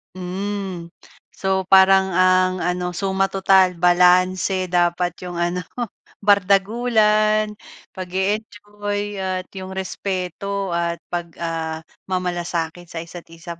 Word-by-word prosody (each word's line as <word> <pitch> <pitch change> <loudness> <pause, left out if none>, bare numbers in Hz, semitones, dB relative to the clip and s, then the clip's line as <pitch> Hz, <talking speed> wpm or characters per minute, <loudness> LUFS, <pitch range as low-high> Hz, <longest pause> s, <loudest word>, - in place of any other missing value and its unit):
Hmm. 185 -1 -4 0.5
So, 190 -1 -1
parang 190 0 +6
ang 185 0 +3
ano, 180 0 -2
suma-total 190 -1 +2
balanse 180 +2 +3
dapat 175 0 +2
'yong 180 -1 -7
ano, 175 +1 -1 0.6
bardagulan, 215 +2 +3 0.4
pag-e-enjoy 205 +2 -3
at 185 -1 -2
'yong 190 -1 -8
respeto 190 0 -3
at 170 0 -2
pag, 175 -1 -2
ah, 160 -1 -4 0.2
mamalasakit 175 -2 -3
sa 165 0 -6
isa't 170 +1 -11
isa. 165 +1 -10
185 Hz, 95 wpm, -21 LUFS, 175-195 Hz, 0.6 s, parang